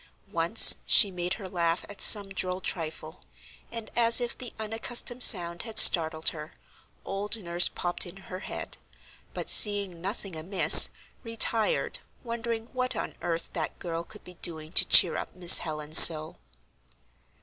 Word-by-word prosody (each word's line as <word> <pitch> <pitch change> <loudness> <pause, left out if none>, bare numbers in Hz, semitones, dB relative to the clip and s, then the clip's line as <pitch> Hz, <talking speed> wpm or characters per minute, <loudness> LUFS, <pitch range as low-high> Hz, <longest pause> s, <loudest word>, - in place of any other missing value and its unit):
Once - - +5
she 205 -4 +2
made 180 +1 -7
her 200 -4 -12
laugh 170 -1 -5
at 205 - -14
some 205 -2 +3
droll 185 -1 -6
trifle, 160 -2 -9 0.5
and 230 -2 -11
as 230 0 +2
if 240 -1 -7
the 250 -3 -12
unaccustomed 225 +3 -5
sound 170 -6 +2
had 225 -2 -13
startled 160 -5 +3
her, 155 -1 -13 0.5
old 205 +3 -7
nurse 175 -3 +1
popped 175 0 -7
in 175 - -15
her 185 -1 -13
head; - - -11 0.6
but - - -8
seeing 200 -5 -1
nothing 195 -1 -9
amiss 180 +5 +7 0.3
retired, 230 -1 -4 0.2
wondering 230 -1 -8
what 255 0 -6
on - - -8
earth 170 -1 -7
that 160 -3 -8
girl 165 -1 -9
could 210 +4 -18
be 180 - -15
doing 160 -2 -7
to - - +2
cheer 170 - +4
up - - -10
Miss 180 -1 +5
Helen 155 -2 -10
so. 155 -1 +7
185 Hz, 150 wpm, -24 LUFS, 170-220 Hz, 0.6 s, amiss